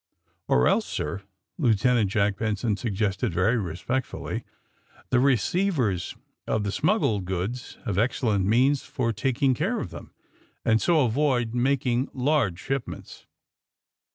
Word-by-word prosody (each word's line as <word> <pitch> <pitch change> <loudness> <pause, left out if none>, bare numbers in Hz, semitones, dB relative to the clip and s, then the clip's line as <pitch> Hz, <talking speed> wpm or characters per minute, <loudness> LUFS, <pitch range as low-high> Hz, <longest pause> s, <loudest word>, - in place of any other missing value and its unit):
'' - - -43
'^Or 65 - +4
else, - - +2
sir," 75 +6 -3 0.4
Lieutenant 120 - +3
Jack 100 0 +1
Benson 110 0 -1
sug 110 0 -3
gested, 105 +3 0
very 95 +8 +2
respectfully, 100 +8 -3 0.7
^^the 125 -1 +4
receivers 135 - +1 0.3
of 110 - 0
the 100 - -1
smuggled 110 - +1
goods 95 +8 -4
have 100 -2 -1
excellent 115 -4 +1
means 130 +6 +3
for 130 -4 -2
taking 130 +4 +1
care 195 - -1
of - - -5
them, - - -10 0.5
and 110 0 +3
so 160 -6 +3
avoid 120 -2 +1
making 125 0 +1
large 130 - +1
ship 135 +6 -3
ments." - - -10
120 Hz, 135 wpm, -26 LUFS, 100-135 Hz, 0.7 s, ^Or